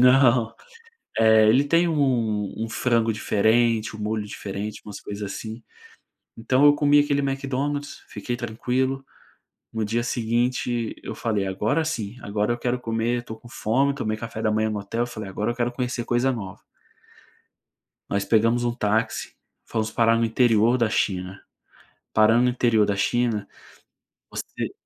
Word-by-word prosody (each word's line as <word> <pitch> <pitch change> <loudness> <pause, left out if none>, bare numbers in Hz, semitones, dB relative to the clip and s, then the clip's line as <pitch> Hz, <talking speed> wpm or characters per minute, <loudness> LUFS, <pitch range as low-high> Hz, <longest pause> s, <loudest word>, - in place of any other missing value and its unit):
não, 125 -2 +5 0.7
eh, 110 -1 +6
ele 130 +6 +5
tem 170 +4 +3
um 120 - +1
um 115 - -2
frango 115 -1 +1
diferente, 110 +2 +2
um - - -10
molho 105 0 -2
diferente, 105 +1 -6
umas 105 -2 -8
coisas 105 0 -7
assim. 110 +3 -6 0.7
Então 130 +4 +2
eu 145 - +7
comi 145 0 +4
aquele 145 -1 +1
Mcdonald's, 140 +1 -3
fiquei 110 +4 -4
tranquilo, 125 +3 -2 0.7
no 110 -1 -1
dia 115 +3 0
seguinte 120 0 -1
eu - - -6
falei: 105 -4 -1
"Agora 110 +12 0
sim, 115 -9 -3
agora 105 +2 0
eu 120 - -3
quero 125 +1 -1
comer, 115 +1 -1
estou 110 -2 -9
com 120 - -15
fome", 135 +5 +1
tomei 110 -6 -2
café 110 0 -6
da 110 - +2
manhã 110 +1 +1
no 105 -1 -3
hotel, 115 +4 -2
falei: 110 -4 -7
"Agora 105 +4 -1
eu - - -12
quero 120 0 0
conhecer 125 -1 -3
coisa 120 +3 +1
nova". 100 -6 -7 1.5
Nós 100 -1 0
pegamos 115 +3 +2
um 120 -1 0
táxi, 110 -1 -1 0.3
fomos 110 -1 -2
parar 115 0 +3
no 115 - +2
interior 115 0 +3
da 120 -3 +2
China. 95 -2 -1 0.7
Parando 110 +3 +5
no 125 - +3
interior 120 -3 +3
da 100 - 0
china 110 0 0 0.8
você - - -5
115 Hz, 155 wpm, -24 LUFS, 110-125 Hz, 1.5 s, eu